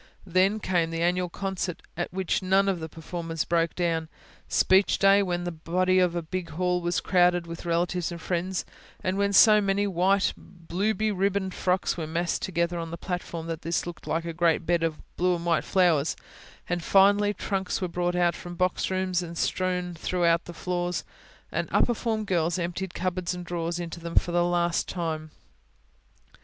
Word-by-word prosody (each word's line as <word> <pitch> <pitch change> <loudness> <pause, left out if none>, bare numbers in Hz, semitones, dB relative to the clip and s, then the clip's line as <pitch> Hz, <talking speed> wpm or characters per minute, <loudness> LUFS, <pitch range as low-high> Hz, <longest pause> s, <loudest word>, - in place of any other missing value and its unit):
Then 190 +3 +2
came 175 -5 +1
the 165 0 -2
annual 180 +1 +1
concert, 190 -1 -4
at 175 +1 -3
which 190 0 -1
none 190 +1 +3
of 190 -3 0
the 160 0 -6
performers 165 0 -4
broke 165 -1 +1
down; 165 -2 -1 0.4
Speech 190 +1 +4
Day, 195 +1 +5
when 175 -2 -1
the 175 - -3
body 185 +3 +1
of 180 -2 +2
a 170 - -2
big 175 +1 -4
hall 180 +2 0
was 175 0 0
crowded 175 -1 +3
with 170 +1 -8
relatives 175 +1 0
and 170 - -6
friends, 180 +2 -2 0.4
and 185 0 0
when 200 0 +1
so 210 +1 +7
many 200 0 +1
white, 190 +1 +2
blue 185 +5 -3
beribboned 200 -2 0
frocks 185 0 0
were 160 -2 -3
massed 170 +2 -1
together 170 -1 -1
on 165 -1 -4
the 170 - -6
platform, 175 -2 -4
that 165 -1 -4
this 165 +1 -1
looked 175 -1 -8
like 165 +1 -1
a 170 - -4
great 170 0 +2
bed 175 0 +2
of 165 -2 -1 0.2
blue 180 0 +2
and 170 0 -6
white 170 -1 +2
flowers; 170 -5 +2 0.5
and, 175 -1 -2
finally, 205 +2 +5
trunks 195 -2 -2
were 185 - -1
brought 175 0 -1
out 175 -1 +3
from 175 0 -8
boxrooms 185 0 0
and 170 -1 -7
strewn 180 0 -1
through 175 +1 0 0.2
the - - -7
floors, 175 0 -2 0.5
and - - -2
upper 240 - +3
form 220 -2 -2
girls 175 -2 +1
emptied 175 +1 -3
cupboards 180 -1 -2
and 180 0 -7
drawers 170 0 -3
into 170 0 -5
them 170 0 -7
for 175 - +3
the 175 0 +3
last 175 -1 +1
time. 160 -3 -3
175 Hz, 185 wpm, -27 LUFS, 170-185 Hz, 0.5 s, so